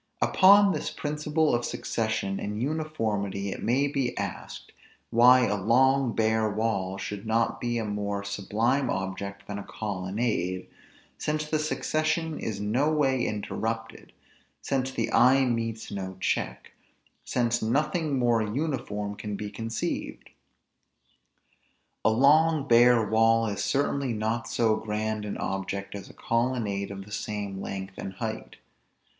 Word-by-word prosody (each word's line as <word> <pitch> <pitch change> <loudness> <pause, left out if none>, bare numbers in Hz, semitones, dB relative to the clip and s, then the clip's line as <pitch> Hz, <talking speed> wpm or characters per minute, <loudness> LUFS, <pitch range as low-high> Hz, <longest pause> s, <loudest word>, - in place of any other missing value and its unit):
Upon 200 +1 +6
this 150 - -2
principle 150 0 0
of 120 0 +1
succession 110 -5 -2
and 105 +1 -4
uniformity 110 -9 -2
it - - -6
may 130 +5 +2
be 135 -3 -2
asked, 100 -2 -6 0.4
why 125 +2 +7
a - - 0
long 130 +3 +3
bare 110 -1 +2
wall 100 -3 -1
should 105 +1 -6
not 115 +1 +1
be 120 -1 -1
a 115 - -2
more 100 -1 -2
sublime 110 +7 0
object 95 +1 -4
than 100 0 -5
a - - -6
colonnade; 95 -2 -2 0.5
since 155 0 -1
the 155 0 0
succession 155 +1 -1
is 105 -3 -4
no 120 +9 +1
way 135 -5 +2
interrupted; 110 +2 -4 0.5
since 135 -1 -1
the 130 - -2
eye 130 +2 +5
meets 115 -2 -2
no 95 -2 -5
check; - - -2 0.5
since 120 -1 0
nothing 150 +5 0
more 120 -2 +3
uniform 105 -4 -2
can 105 0 -5
be 105 0 -5
conceived? 115 +2 -4 1.7
A - - +5
long 145 +5 +4
bare 120 -2 +5
wall 115 +1 +4
is 100 -2 -2
certainly 140 -2 0
not 110 +2 -2
so 110 -2 +2
grand 110 0 -2
an 105 - -4
object 95 +1 -3
as 100 -1 -8
a - - -13
colonnade 115 -4 -1
of 100 -1 -7
the 105 - -15
same 100 -2 -4
length 95 0 -6
and 95 - -5
height. - - -5
115 Hz, 135 wpm, -27 LUFS, 100-130 Hz, 1.7 s, why